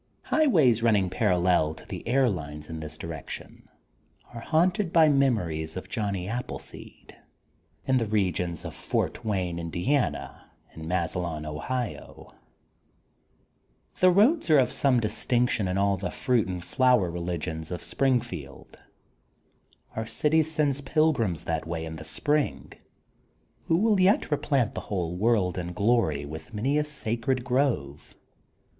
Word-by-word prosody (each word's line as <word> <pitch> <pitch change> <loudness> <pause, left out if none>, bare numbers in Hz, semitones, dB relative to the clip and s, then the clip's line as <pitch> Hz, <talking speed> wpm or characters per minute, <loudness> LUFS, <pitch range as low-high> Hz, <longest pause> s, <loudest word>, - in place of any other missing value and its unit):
Highways 155 - +3
running 105 -6 +2
parallel 90 -5 +2
to - - -13
the - - -6
air 130 +2 +3
lines 75 -6 -5
in 80 - -5
this 80 0 -7
direction 80 -3 -8 0.6
are 115 - -7
haunted 175 - +1
by 160 -2 +6
mem 140 -3 +4
ories 80 -4 -4
of 95 - -7
Johnny 100 -5 -2
Appleseed, 125 +4 -7 0.7
in 130 -1 +3
the 115 -3 0
regions 90 -5 -1
of - - -5
Fort - - -2
Wayne, 90 -5 -1
Indiana, 90 - -2 0.2
and 80 0 -8
Massilon, 85 -3 -2
Ohio. 115 +11 -5 1.7
The 185 - +6
roads 215 - +3
are 155 - +7
of 130 -2 +3
some 130 -3 +2
distinction 120 -1 0
in 90 +1 -1
all 100 0 +2
the 90 -1 -3
fruit 120 0 +1
and 90 -2 -5
flower 125 -9 +3
religions 85 -2 -4
of 90 -2 -5
Springfield. 105 - -2 1.2
Our 110 0 -3
city 155 +5 +2
sends 150 -3 0
pilgrims 135 - +1
that 80 -1 -2
way 80 -1 -3
in 80 0 -7
the - - -8
spring 145 - -1 0.9
who 165 - +3
will 210 0 +3
yet 185 -3 +3
replant 140 -5 +1
the - - -4
whole 90 -4 -3
world 100 -3 +1
in 90 0 -5
glory 100 -10 +1
with 80 +10 -9
many 135 +8 +1
a - - +1
sacred 130 -3 -2
grove. 125 - -1
105 Hz, 140 wpm, -27 LUFS, 85-135 Hz, 1.7 s, are